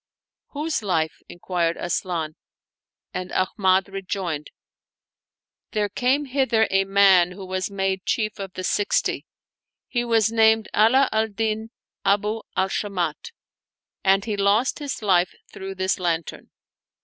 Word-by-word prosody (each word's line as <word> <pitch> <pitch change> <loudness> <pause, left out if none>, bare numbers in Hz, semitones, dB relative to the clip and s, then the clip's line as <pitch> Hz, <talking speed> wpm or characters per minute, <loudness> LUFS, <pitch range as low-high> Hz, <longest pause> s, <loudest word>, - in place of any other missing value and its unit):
" - - -69
Whose 300 0 -2
life? 160 -6 -1
" - - -51
inquired 175 -1 -1
Asian; 170 -3 -2 0.8
and 185 0 -4
Ahmad 190 0 +2
rejoined, 190 -5 -4 1.2
"There 210 -2 0
came 260 +8 +1
hither 250 -5 +2
a 195 0 +3
man 190 -3 +5
who 190 +1 -9
was 185 +1 -2
made 195 -1 -2
Qiief 215 -1 -1
of 195 -2 -6
the 185 - -6
Sixty; 205 +2 0 0.6
he 240 -1 -1
was 225 -2 +2
named 220 -1 +4
Ala 255 +6 +5
al 220 0 +1
Din 220 +1 -2 0.3
Abu 210 +3 +1 0.2
al 190 - +2
Shamat, 200 - -3 0.7
and 195 +1 +3
he 215 -2 -2
lost 205 +5 +2
his 285 -6 -5
life 180 -3 +2 0.2
through 195 0 -7
this 185 +1 0
lantern." 170 -2 -2
200 Hz, 135 wpm, -23 LUFS, 185-220 Hz, 1.2 s, man